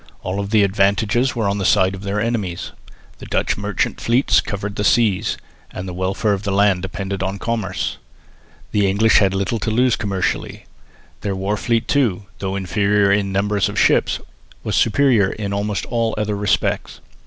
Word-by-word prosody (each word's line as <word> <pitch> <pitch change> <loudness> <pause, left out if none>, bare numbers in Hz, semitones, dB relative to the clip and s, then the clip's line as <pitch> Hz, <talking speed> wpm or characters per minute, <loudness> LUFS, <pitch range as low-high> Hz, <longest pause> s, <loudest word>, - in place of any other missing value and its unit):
All 95 +2 -2
the 105 +1 +2
advantages 100 +6 +1
were 110 -4 0
on 100 +1 -1
the - - -2
side 95 0 +3
of 95 - -7
their 100 +1 -2
enemies. 105 -6 -2 0.5
The - - -10
Dutch - - 0
merchant 100 -2 -2
fleets 120 +4 +3
covered 100 0 -5
the 105 - -2
seas, 105 -2 +2 0.3
and 90 - -7
the 90 - -5
welfare 95 +3 0
of 100 - -2
the 100 - -3
land 100 -2 +3
depended 95 +1 -4
on 95 +1 -2
commerce. 100 -4 -3 0.7
The 100 -2 +2
English 110 +3 +4
had 95 -2 +2
little 100 +4 -1
to - - -2
lose 120 +2 +3
commercially. 95 -3 -3 0.6
Their 100 -2 -2
war 95 +2 -1
fleet 115 +1 0
too, 115 -9 +1 0.2
though 95 0 -3
inferior 100 +1 +2
in 100 0 +2
the 95 - -5
number 105 +1 0
of 100 - 0
ships, - - +3 0.4
was - - -2
superior 115 -4 +3
in 100 -1 -4
almost 100 0 -2
all 115 -2 -1
other 105 -1 -1
respects. 100 -1 -1
100 Hz, 175 wpm, -20 LUFS, 95-110 Hz, 0.7 s, English